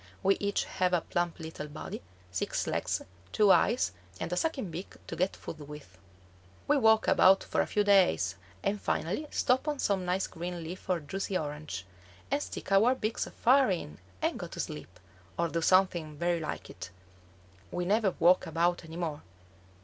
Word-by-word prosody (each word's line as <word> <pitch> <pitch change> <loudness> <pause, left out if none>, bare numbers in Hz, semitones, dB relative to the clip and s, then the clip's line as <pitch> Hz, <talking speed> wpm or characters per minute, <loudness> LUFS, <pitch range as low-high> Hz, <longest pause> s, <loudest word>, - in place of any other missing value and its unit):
We 195 +1 +4
each 200 0 0
have 185 -1 0
a 175 - +3
plump 175 +1 -2
little 160 -2 -6
body, 150 +1 -7 0.3
six 90 - -1
legs, - - -1 0.3
two 210 -2 +5
eyes, 220 - +3 0.3
and 180 - -3
a - - +1
sucking 265 - -1
beak 175 +4 -7
to - - -6
get 185 +2 0
food 160 - -8
with. 150 -11 -11 0.7
We 295 - +4
walk 220 -4 +4
about 190 +1 +6
for - - 0
a - - -1
few 210 - +1
days, 185 - +4 0.3
and 205 +1 0
finally 200 - -1
stop 255 +4 +1
on 295 -1 0
some 200 -7 0
nice 180 +2 0
green 175 0 -5
leaf 180 +4 -8
or 180 -3 +1
juicy 190 +5 -2
orange, 150 - -5 0.5
and 285 +1 +1
stick - - -6
our 220 +7 +5
beaks 220 -2 -2
far 260 0 +4
in 165 - -3 0.2
and - - 0
go - - -5
to - - -9
sleep, 80 +4 -6 0.4
or 170 0 +1
do 165 +1 -1
something 175 -4 +2
very 175 +1 +1
like 155 - -5
it. 85 -1 -8 0.8
We 175 0 -2
never 200 0 +2
walk 180 +2 +4
about 170 +2 +1
any 165 0 -9
more. 160 -4 -3
180 Hz, 180 wpm, -30 LUFS, 160-200 Hz, 0.8 s, about